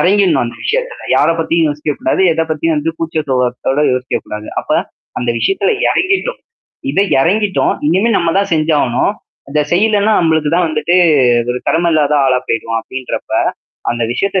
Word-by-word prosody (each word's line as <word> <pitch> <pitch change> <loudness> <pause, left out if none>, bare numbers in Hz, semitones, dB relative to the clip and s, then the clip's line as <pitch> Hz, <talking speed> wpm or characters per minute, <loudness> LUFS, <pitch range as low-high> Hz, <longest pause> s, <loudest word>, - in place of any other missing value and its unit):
எறங்கிடணும். 195 -5 +3
அந்த 120 - -6
விஷயத்துல, - - -2
யார - - +3
பத்தியும் 165 0 +1
யோசிக்கக்கூடாது. 150 +4 -1
எத 165 - -1
பத்தியும் 155 +1 0
வந்து 155 +2 -1
கூச்சசுபாவத்தோட 135 -4 -1
யோசிக்கக்கூடாது. 110 -4 -4
அப்ப - - -13 0.5
அந்த 120 -1 -1
விஷயத்ல 195 - +1 0.2
எறங்கிட்டோம் 390 +7 0 0.5
இத 195 - +1 0.2
எறங்கிட்டோம். 195 +6 +1
இனிமே 190 +9 +2
நம்ம 170 -1 +1
தான் 200 0 +1
செஞ்சாகணும். 150 -5 +1 0.4
அந்த 150 +2 0
செய்யலன்னா 210 +3 +2
நம்மளுக்கு 160 -3 +1
தான் 180 +1 +2
வந்துட்டு 155 +2 0 0.6
ஒரு 125 - -2
கடம 170 +1 +2
இல்லாத 150 -1 +2
ஆளா 130 -1 +3
போய்டுவோம் 115 0 -1
அப்டின்றப்ப. 130 +3 -6 0.6
அந்த 120 0 -2
விஷயத்த 195 +8 0
160 Hz, 140 wpm, -15 LUFS, 135-190 Hz, 0.6 s, எறங்கிடணும்